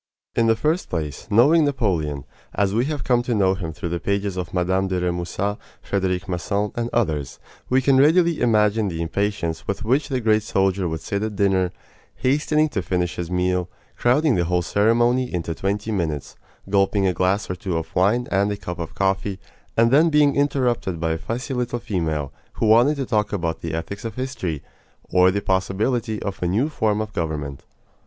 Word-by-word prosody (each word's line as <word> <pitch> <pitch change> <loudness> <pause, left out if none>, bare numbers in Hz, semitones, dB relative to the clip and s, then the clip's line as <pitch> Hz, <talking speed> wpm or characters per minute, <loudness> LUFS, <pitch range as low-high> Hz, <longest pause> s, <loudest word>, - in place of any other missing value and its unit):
In 115 - +3
the 115 - +4
first 155 +10 0
place, 75 -4 -4
knowing 140 +10 +5
Napoleon, 85 - -1 0.3
as 100 -1 +1
we 115 +4 +2
have 150 0 -3
come 125 -2 +2
to 120 -1 -1
know 95 -2 +3
him 90 -4 -4
through 80 +2 -5
the 85 +1 -2
pages 100 +2 -1
of 90 -2 -4
Mme. 95 +1 +1
de 95 -1 -1
Remusat, 90 +3 -2 0.2
Frederic 95 -1 -1
Masson, 100 +3 -1
and 120 0 -2
others, 75 - -1 0.3
we 130 +1 +3
can 135 0 +4
readily 165 +3 +4
imagine 105 -2 +3
the 85 -3 -4
impatience 85 -1 -2
with 100 +3 -2
which 135 +6 +1
the 130 -2 0
great 110 -2 +3
soldier 95 -3 0
would 80 0 -4
sit 100 - -3
at 110 -1 -3
dinner, 95 -2 +2 0.4
hastening 150 +3 +2
to 100 - -2
finish 90 0 -1
his 85 -1 -4
meal, 90 0 0 0.3
crowding 135 +4 +3
the 90 -5 +1
whole 90 +1 +1
ceremony 120 +6 +2
into 85 -2 -2
twenty 100 +5 -2
minutes, 80 -8 -2 0.3
gulping 100 0 +2
a 95 - +2
glass 95 +4 +1
or - - -2
two 90 -3 -3
of 80 0 -6
wine 110 +7 +2
and 100 +1 +2
a 100 - -3
cup 90 -3 -6
of 85 - -6
coffee, 95 0 0 0.4
and 115 +1 +4
then 155 +5 +5
being 150 -2 +4
interrupted 125 - 0
by 80 0 0
a 80 - 0
fussy 120 +8 -4
little 125 -1 -1
female 80 - -2 0.2
who - - -1
wanted 120 +7 +5
to 135 -2 -3
talk 105 -4 0
about 85 -5 -2
the 80 -1 -3
ethics 85 +5 -5
of 115 -2 -5
history, 120 - -4 0.5
or 90 0 +5
the 100 +2 -1
possibility 105 +4 0
of 100 -2 -5
a 90 - +1
new 110 - +1
form 110 -7 0
of 105 -2 -5
government. 75 -6 -3
100 Hz, 190 wpm, -22 LUFS, 90-120 Hz, 0.5 s, knowing